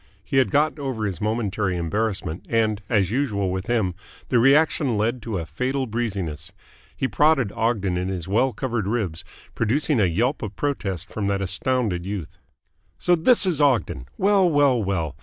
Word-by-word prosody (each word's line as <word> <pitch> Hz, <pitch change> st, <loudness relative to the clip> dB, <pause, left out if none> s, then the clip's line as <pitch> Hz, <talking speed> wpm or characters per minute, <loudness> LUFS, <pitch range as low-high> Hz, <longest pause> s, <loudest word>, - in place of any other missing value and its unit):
He 135 Hz, -, -2 dB
had 130 Hz, -, +4 dB
got 155 Hz, +1 st, +1 dB
over 130 Hz, -6 st, -3 dB
his 100 Hz, -1 st, -4 dB
momentary 105 Hz, -4 st, -1 dB
embarrassment, 95 Hz, -1 st, -2 dB
and, 110 Hz, -2 st, +1 dB
as 100 Hz, -5 st, +2 dB
usual 105 Hz, -8 st, 0 dB
with 95 Hz, 0 st, -4 dB
him, 110 Hz, -6 st, +1 dB, 0.4 s
the 125 Hz, -, +3 dB
reaction 135 Hz, -1 st, +3 dB
led 115 Hz, +4 st, 0 dB
to 110 Hz, -3 st, -3 dB
a 85 Hz, -, -4 dB
fatal 130 Hz, -, -2 dB
breeziness. 95 Hz, -9 st, -4 dB, 0.5 s
He 130 Hz, -, 0 dB
prodded 145 Hz, -7 st, +3 dB
Ogden 100 Hz, -6 st, 0 dB
in 90 Hz, +1 st, -2 dB
his 90 Hz, -3 st, -4 dB
well 120 Hz, +7 st, +2 dB
covered 120 Hz, -6 st, -3 dB
ribs, 100 Hz, -6 st, -2 dB, 0.3 s
producing 130 Hz, +4 st, +1 dB
a 100 Hz, -, +4 dB
yelp 110 Hz, -, 0 dB
of 105 Hz, -2 st, -5 dB
protest 100 Hz, -, -3 dB
from 105 Hz, -2 st, -3 dB
that 100 Hz, -1 st, 0 dB
astounded 100 Hz, -1 st, -1 dB
youth. 100 Hz, -6 st, -6 dB, 0.6 s
"So 175 Hz, -, +3 dB
this 205 Hz, +7 st, +4 dB
is 170 Hz, -5 st, +1 dB
Ogden! 115 Hz, -, +1 dB
Well, 195 Hz, -2 st, +4 dB
well, 140 Hz, -6 st, +3 dB
well! 85 Hz, -7 st, -2 dB
110 Hz, 170 wpm, -23 LUFS, 95-130 Hz, 0.6 s, had